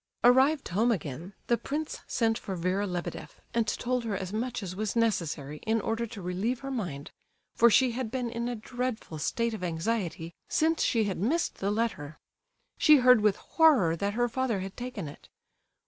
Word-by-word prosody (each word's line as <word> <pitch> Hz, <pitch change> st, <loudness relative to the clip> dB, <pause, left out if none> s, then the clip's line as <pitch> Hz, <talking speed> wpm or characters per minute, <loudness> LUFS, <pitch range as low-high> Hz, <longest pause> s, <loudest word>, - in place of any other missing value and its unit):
Arrived 265 Hz, +4 st, +4 dB
home 220 Hz, +7 st, +2 dB
again, 170 Hz, -, -4 dB
the 235 Hz, -, +1 dB
prince 305 Hz, +2 st, -4 dB
sent 225 Hz, -1 st, +1 dB
for 195 Hz, -3 st, -5 dB
Vera 185 Hz, +4 st, 0 dB
Lebedeff 180 Hz, -2 st, -5 dB
and 230 Hz, -2 st, +1 dB
told 250 Hz, +3 st, -1 dB
her 215 Hz, -4 st, -2 dB
as 190 Hz, +1 st, -5 dB
much 225 Hz, 0 st, -2 dB
as 185 Hz, -1 st, -5 dB
was 215 Hz, +2 st, -2 dB
necessary, 165 Hz, -10 st, 0 dB
in 220 Hz, +7 st, 0 dB
order 225 Hz, +2 st, -2 dB
to 210 Hz, -4 st, -9 dB
relieve 195 Hz, +8 st, -2 dB
her 275 Hz, 0 st, -5 dB
mind, 175 Hz, -, -4 dB, 0.4 s
for 235 Hz, -, +6 dB
she 255 Hz, +2 st, +4 dB
had 240 Hz, -1 st, -3 dB
been 250 Hz, 0 st, -2 dB
in 235 Hz, +1 st, -3 dB
a 245 Hz, -, -2 dB
dreadful 240 Hz, -7 st, -4 dB
state 230 Hz, +8 st, -1 dB
of 215 Hz, -, -6 dB
anxiety 170 Hz, -1 st, -2 dB, 0.2 s
since 325 Hz, -1 st, +2 dB
she 225 Hz, -2 st, +2 dB
had 195 Hz, -4 st, -2 dB
missed 295 Hz, -, 0 dB
the 195 Hz, -, 0 dB
letter. 205 Hz, -9 st, -2 dB, 0.6 s
She 305 Hz, -, +7 dB
heard 250 Hz, -3 st, +6 dB
with 210 Hz, -2 st, +3 dB
horror 275 Hz, -, +3 dB
that 200 Hz, +4 st, -2 dB
her 240 Hz, +1 st, +2 dB
father 235 Hz, -4 st, -1 dB
had 190 Hz, +1 st, -6 dB
taken 245 Hz, -8 st, -5 dB
it. 145 Hz, -, -12 dB
225 Hz, 185 wpm, -29 LUFS, 185-245 Hz, 0.6 s, She